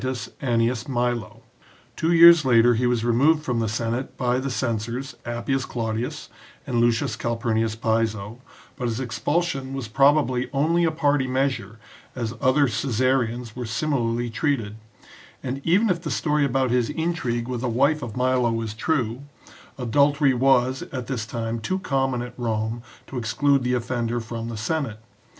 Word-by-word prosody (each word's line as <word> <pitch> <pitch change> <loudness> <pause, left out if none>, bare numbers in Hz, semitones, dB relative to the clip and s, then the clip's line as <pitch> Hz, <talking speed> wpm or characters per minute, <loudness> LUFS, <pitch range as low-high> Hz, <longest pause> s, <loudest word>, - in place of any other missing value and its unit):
Annius 120 -1 0
Milo. 120 -3 -2 0.5
Two 165 - 0
years 170 -1 +8
later 120 -2 +5
he 120 +2 +1
was 120 -2 0
removed 145 +7 +3
from 125 -5 -1
the 110 -2 0
Senate 115 +4 -3
by 125 0 +1
the 135 +1 -3
censors, 120 +2 -3
Appius 120 +3 -1
Claudius, 115 0 -4 0.4
and 120 -1 0
Lucius 120 -1 +1
Calpurnius 115 -1 -1
Piso, 110 0 -1 0.3
but 125 -4 -3
his 115 0 -2
expul 130 +7 0
sion 135 -5 -4
was 135 -4 -4
probably 135 0 +2
only 165 +5 +2
a - - +3
party 145 -4 +1
measure, 125 -5 -1 0.4
as 115 -3 -3
other 135 +2 +4
Caesarians 125 -1 0
were 125 -2 -5
similarly 120 -1 -1
treated, 115 -5 -1 0.7
and 130 +1 -4
even 190 +7 +3
if 175 -4 0
the 165 - -4
story 150 -2 +1
about 130 -2 +1
his 125 -2 +1
intrigue 145 -8 -2
with 125 -2 -3
the 125 - -1
wife 140 +6 +2
of 120 -3 -6
Milo 125 -2 +1
is 110 -2 -4
true, 120 0 -1 0.6
adul 140 +4 +2
tery 140 -2 +3
was 130 0 +2
at 130 -3 -4
this 115 -3 -4
time 115 0 -3
too 185 +11 -2
common 135 -8 -1
at 120 0 -8
Rome 110 0 -2 0.2
to 130 - -5
exclude 140 +4 +1
the 125 0 0
offender 120 -1 -2
from 115 0 -6
the 115 - -5
Senate. 115 -1 -2
125 Hz, 160 wpm, -24 LUFS, 115-135 Hz, 0.7 s, years